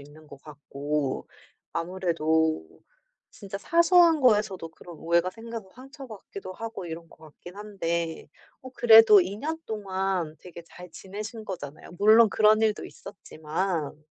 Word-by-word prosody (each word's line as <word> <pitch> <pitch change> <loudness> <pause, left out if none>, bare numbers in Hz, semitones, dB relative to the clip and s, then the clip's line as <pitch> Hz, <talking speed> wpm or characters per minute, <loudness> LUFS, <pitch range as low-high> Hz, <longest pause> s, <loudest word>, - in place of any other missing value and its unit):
있는 150 +2 -16
것 140 -2 -14
같고 145 -1 -4 0.5
아무래도 165 -3 -1 0.6
진짜 200 -2 -8
사소한 340 - +4
거에서도 210 -8 +2
그런 170 +1 -13
오해가 170 +2 +1
생겨서 225 -1 -9
상처받기도 255 -8 -10
하고 225 -3 -7
이런 165 0 -8
것 - - -20
같긴 175 +4 -14
한데. 170 -6 -4 0.3
어 260 - -10
그래도 225 -4 +7
2 185 +3 -3
년 315 +7 -4
동안 190 -6 -3
되게 175 -1 -11
잘 180 +1 -13
지내신 215 +3 -8
거잖아요 155 -7 -8
물론 220 +1 +6
그런 215 +1 +4
일도 215 -1 0
있었지만. 155 -4 -5
190 Hz, 285 characters per minute, -26 LUFS, 165-220 Hz, 0.6 s, 그래도